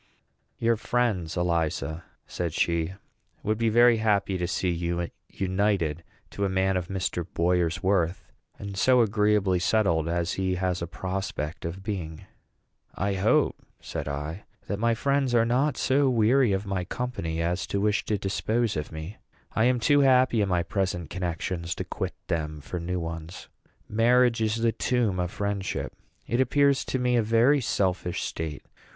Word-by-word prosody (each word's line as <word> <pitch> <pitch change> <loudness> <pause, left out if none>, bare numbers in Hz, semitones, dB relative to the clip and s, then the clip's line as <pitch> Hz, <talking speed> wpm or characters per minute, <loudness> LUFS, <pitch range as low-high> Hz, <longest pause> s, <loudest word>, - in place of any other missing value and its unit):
"Your 115 0 +2
friends, 105 -9 -1
Eliza," 85 -2 -1 0.2
said 85 -3 -3
she, 85 +1 0 0.5
"would 110 +1 0
be 115 -1 +2
very 120 +1 +6
happy 100 -3 +1
to 90 -1 -1
see 95 -1 0
you 85 0 -2 0.2
united 95 -4 0 0.3
to 100 - -3
a 100 - +1
man 95 0 +1
of 90 -2 -1
Mr. 95 -2 -2
Boyer's 90 +1 +1
worth, 95 -2 +1 0.3
and 100 -1 -7
so 125 +5 +4
agreeably 105 -3 +2
settled 85 -5 +2
as 85 +1 0
he 95 -1 -1
has 90 -1 -1
a 85 - -3
prospect 85 -3 -4
of 90 +3 -5
being." 90 -7 -5 0.7
"I 100 +1 0
hope," 95 +3 +2 0.2
said - - -5
I, 75 +6 -5 0.2
"that 100 - -3
my 115 +1 +2
friends 140 0 +1
are 115 -1 +4
not 130 +3 +1
so 135 +1 +3
weary 120 +1 +3
of 95 +1 -1
my 95 -2 -2
company 90 -6 -3
as 85 +1 -1
to 100 - -1
wish 105 +1 +1
to 105 - 0
dispose 110 +3 -1
of 75 -1 -4
me. 80 +6 -7 0.4
I 110 - +3
am 125 0 +3
too 145 +4 +4
happy 130 -4 +4
in 100 - +1
my 90 -2 +1
present 90 -4 -2
connections 85 -1 -3
to - - -3
quit - - -4
them 75 -3 -2
for 85 +5 -5
new 90 +2 -2
ones. 80 +1 -7 0.4
Marriage 120 +1 +3
is 110 -1 +1
the 115 0 +2
tomb 115 -6 0
of 90 -1 0
friendship. 100 -1 -3 0.3
It 120 +2 +1
appears 140 +1 +3
to - - -1
me 125 -1 +2
a - - +4
very 115 +6 +4
selfish 90 -5 -1
state. 80 -3 -4
95 Hz, 165 wpm, -27 LUFS, 85-115 Hz, 0.7 s, very